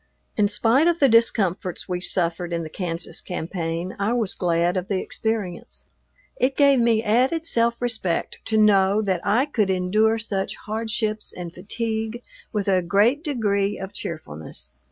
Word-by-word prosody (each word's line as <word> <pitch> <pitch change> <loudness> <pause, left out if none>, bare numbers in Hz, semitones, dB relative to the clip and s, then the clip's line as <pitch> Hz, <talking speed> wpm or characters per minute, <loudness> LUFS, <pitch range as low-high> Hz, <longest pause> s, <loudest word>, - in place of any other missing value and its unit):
In 210 -1 +3
spite 230 +9 +3
of 345 -1 +3
the 275 - +6
discomforts 200 -6 +1
we 180 -1 -2
suffered 175 -1 -1
in 170 0 -1
the 155 - -8
Kansas 170 -2 -4
campaign, 170 0 -4
I 205 +4 +1
was 225 -5 0
glad 175 0 +1
of 185 0 -2
the 195 -2 0
experience. 215 -6 -4 0.5
It 260 +2 +1
gave 280 -2 +5
me 230 -2 +3
added 255 +9 +2
self 235 -6 +1
respect 220 -8 -2
to 220 - +1
know 205 -1 +4
that 190 -4 0
I 240 +6 +3
could 220 -9 0
endure 205 +5 +2
such 200 -2 -3
hardships 215 0 -2
and 175 -2 -7
fatigue 220 +4 -4 0.3
with 205 -2 -2
a 190 -2 +3
great 210 - +2
degree 210 - 0
of 195 +1 -7
cheerfulness. 80 - -7
205 Hz, 155 wpm, -23 LUFS, 180-230 Hz, 0.5 s, the